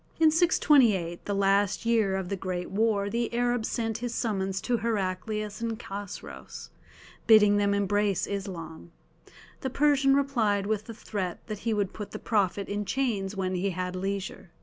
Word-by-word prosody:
In 320 -1 +6
628, 245 - +3
the 205 - -1
last 200 +2 +2
year 220 -4 +2
of 190 -2 -3
the 200 - -1
great 180 -1 -4
war, 205 -1 +1
the 230 +3 -1
Arab 245 -1 +1
sent 225 -2 -2
his 240 0 -4
summons 195 -4 -1
to 245 -1 0
Heraclius 210 0 -2
and 230 -1 -2
Chosroës, 65 - -8 0.6
bidding 210 -2 +7
them 200 0 +2
embrace 200 -1 +1
Islam. 175 -5 -6 0.7
The 265 - -3
Persian 275 0 +3
replied 230 -8 +1
with 215 0 -1
the 230 - -8
threat 190 -5 -4
that 215 -3 -5
he 225 +1 -1
would 200 -2 -1
put 210 -2 -6
the - - -6
Prophet 200 -3 0
in 205 +1 -2
chains 210 -5 -1
when 190 -1 -1
he 185 +2 0
had 185 0 -3
leisure. 190 -1 -4
205 Hz, 165 wpm, -28 LUFS, 190-230 Hz, 0.7 s, bidding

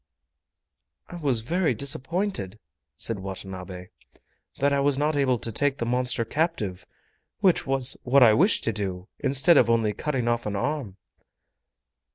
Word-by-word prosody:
"I 175 - -8
was 135 -8 0
very 170 +8 0
disappointed," 140 - -1 0.4
said 115 -3 -4
Watanabe, 95 -1 -8 0.7
"that 140 +1 +1
I 140 - +2
was 140 -1 +2
not 150 +2 0
able 135 -3 +2
take 135 +5 0
the 115 - -3
monster 125 -1 0
captive, 115 - -2 0.5
which 185 -6 +2
was 135 -1 0
what 130 +1 +4
I 110 -3 +7
wished 185 - +3
to 115 - -1
do, 95 -2 -4
instead 140 +4 +4
of 115 - +4
only 115 -2 +2
cutting 130 +1 -2
off 120 -2 0
an 105 - -3
arm!" 120 -3 -3
125 Hz, 145 wpm, -25 LUFS, 105-145 Hz, 0.7 s, I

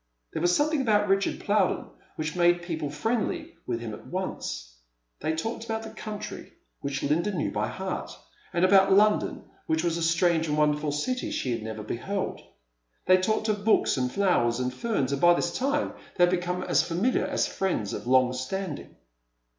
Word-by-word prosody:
There - - -2
was 175 0 +3
something 300 0 +2
about 210 -4 +3
Richard 195 0 +1
Plowden 205 -2 +1 0.3
which 155 +1 -3
made 175 0 +3
people 160 -4 -3
friendly 240 - -2
with 120 -2 -1
him 115 -2 -5
at - - -10
once. - - -4 0.4
They 160 - -1
talked 225 +7 -3
about 225 -1 -3
the 220 - -8
country, 215 -1 -7 0.3
which 140 0 -3
Linda 170 +8 +1
knew 175 -7 -1
by - - -1
heart, - - -4 0.4
and 175 +1 +3
about 195 0 +5
London, 210 +2 +3 0.2
which 160 +1 +1
was 170 -1 0
a - - -3
strange 165 0 +2
and 150 0 0
wonderful 150 0 +2
city 250 - -2
she 130 - -2
had 115 -1 -2
never 110 0 -6
beheld. 190 - -3 0.6
They 185 - +6
talked 215 +4 0
of 205 -2 -1
books 220 - +3
and 125 -2 -1
flowers 125 -12 +2
and 125 0 -1
feme, 205 - 0
and 140 +1 -2
by 175 0 +7
this 175 - -1
time 280 +2 0 0.2
they 175 - +5
had 175 - +5
become 180 0 -1
as - - +3
familiar 190 +10 0
as - - +1
friends 175 - -2
of - - -6
long 130 0 +4
stamling. 150 +6 -4
175 Hz, 185 wpm, -27 LUFS, 145-205 Hz, 0.6 s, by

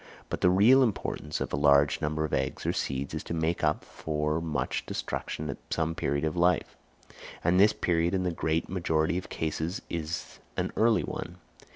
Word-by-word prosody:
But - - -3
the 90 - +5
real 110 +9 +6
importance 95 -9 -1
of - - -3
a - - +1
large 70 0 +4
number 75 +1 0
of 75 - -6
eggs - - -1
or - - +1
seeds 70 +1 -2
is 80 - -3
to 85 - -3
make 80 +1 -1
up 75 0 +1
for 75 +1 -2
much 80 -3 -2
destruction 75 - -4
at 70 - -5
some 80 0 0
period 70 -2 -1
of 80 +1 -1
life; 90 +1 +2 0.7
and 90 +2 +3
this 105 +2 +7
period 85 +1 +1
in 95 - 0
the 90 - 0
great 80 0 -1
majority 85 -1 0
of - - -11
cases 80 +3 -3
is 80 -1 -4 0.2
an - - -1
early 110 -6 +3
one. - - -6
80 Hz, 190 wpm, -29 LUFS, 75-90 Hz, 0.7 s, this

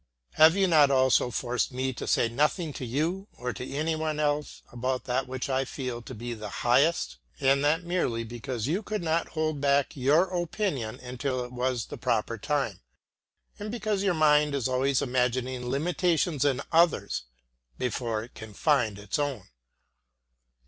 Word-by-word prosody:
Have 160 +2 +6
you 195 -1 +3
not 155 -5 +5
also 130 -2 +3
forced 120 +1 -1
me 130 +1 -2
to - - -6
say - - +3
nothing 150 +6 0
to - - -6
you, 165 - -1
or 125 0 -3
to 125 +6 -7
anyone 155 +1 -1
else, 150 0 -1
about 130 +1 -2
that 130 +1 -1
which 130 +1 -4
I 135 -1 +1
feel 125 -3 -5
to 125 +2 -9
be 120 +2 -5
the 105 -2 -7 0.2
highest? 120 - +3 0.2
And 140 0 +3
that 155 +4 +2
merely 170 -10 -1
because 120 0 -5
you 170 +9 0
could 215 -3 -4
not 165 0 +1
hold 155 -2 0
back 140 -1 +2
your 145 +5 +4 0.2
opinion 160 - -2
until 125 +1 -3
it 125 - -11
was 125 -2 -1
the - - -9
proper - - -1
time, - - -1 0.8
and 205 +1 -5
because 215 -3 -1
your 195 -3 +1
mind 150 -2 +4
is 130 -4 0
always 130 +1 +1
imagining 125 -1 -1
limitations 165 +1 +1
in 140 -3 +1
others 165 - +2 0.5
before 115 -3 -2
it 120 - -13
can 110 -2 -10
find 125 -10 +2
its 105 +5 -3
own. 140 -9 -3
135 Hz, 165 wpm, -28 LUFS, 125-155 Hz, 0.8 s, Have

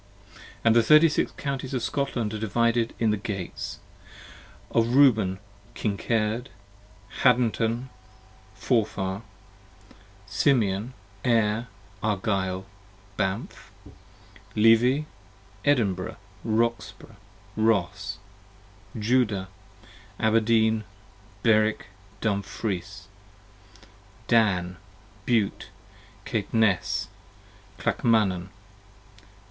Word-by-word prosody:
And 115 -1 +4
the 120 - +7
Thirty 155 +8 +7
six 150 - 0
Counties 135 -1 -3
of 125 - -2
Scotland, 115 -2 -1
divided 115 +2 0
in 115 -2 +2
the 105 - 0
Gates: 100 -3 -5 0.9
Of 115 +2 +2
Reuben, 110 -9 +5 0.4
Kincard, 110 +3 -1 0.7
Haddntn, 120 0 +2 0.7
Forfar. 100 -4 -1 1.0
Simeon, 105 +2 +1 0.3
Ayr, 115 -1 +2 0.3
Argyll, 95 -2 -1 0.5
Banff. 95 +4 -3 0.8
Levi, 115 +6 +5 0.6
Edinburh, 100 -10 +1 0.3
Roxbro, 115 0 -2 0.4
Ross. 100 -3 0 0.8
Judah, 105 -4 +1 0.7
Abrdeen, 110 0 +3 0.6
Berwik, 110 -2 +2 0.3
Dumfries. 100 -2 -3 0.7
55 100 +1 -25
Dan, 95 -6 +2 0.5
Bute, 115 -5 +1 0.6
Caitnes, 105 -3 0 0.7
Clakmanan. 100 -6 +1
110 Hz, 65 wpm, -26 LUFS, 100-115 Hz, 1.0 s, the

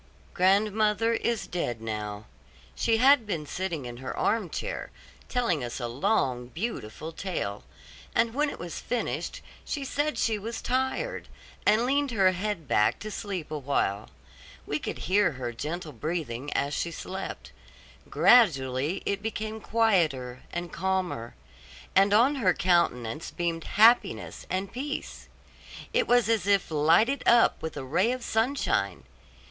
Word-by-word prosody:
Grandmother 210 +4 +3
is 230 -1 -1
dead 120 -10 -3
now. 105 -1 -5 0.5
She 225 - +1
had 260 -1 +5
been 165 -7 -2
sitting 165 -3 -3
in 120 -1 -7
her 130 +1 -6
arm 215 -5 +1
chair, - - -4 0.4
telling 230 - 0
us 120 +1 -5
a 120 - -2
long, 125 - 0
beautiful 160 - -5
tale; 165 - -4 0.5
and 230 0 +2
when 295 +3 +1
it - - -7
was 170 -1 -6
finished, 245 -1 -3 0.2
she 280 -2 -4
said 290 +3 -1
she 220 -2 +1
was 225 +3 -5
tired, 265 - -1 0.4
and 220 +3 +4
leaned 280 +2 +1
her 195 -5 +4
head 185 -4 -3
back 105 - +3
to 215 - -7
sleep 190 -8 -5
awhile. 135 -9 -1 0.6
We 145 - -2
could - - -5
hear 185 -1 +3
her 125 -2 -4
gentle 155 +6 -5
breathing 145 -1 -4
as 140 +1 0
she 170 - -1
slept; 190 +3 -6 0.6
gradually 145 - +4
it 200 0 -1
became 220 0 -4
quieter 160 - +1
and 175 0 -5
calmer, 185 -10 -2 0.6
and 195 +1 +5
on 245 +7 +4
her 185 -8 +2
countenance 155 -7 +1
beamed 170 -1 -3
happiness 195 - +3
and 190 +1 -2
peace. 285 +4 -5 0.6
It 485 -1 +2
was 245 -3 +4
as 225 -4 +1
if 200 -4 +2
lighted 165 - +3
up 235 0 +5
with 160 -2 -5
a 135 - -4
ray 185 - +2
of 255 -1 -4
sunshine. 240 +6 0
185 Hz, 140 wpm, -27 LUFS, 145-225 Hz, 0.6 s, had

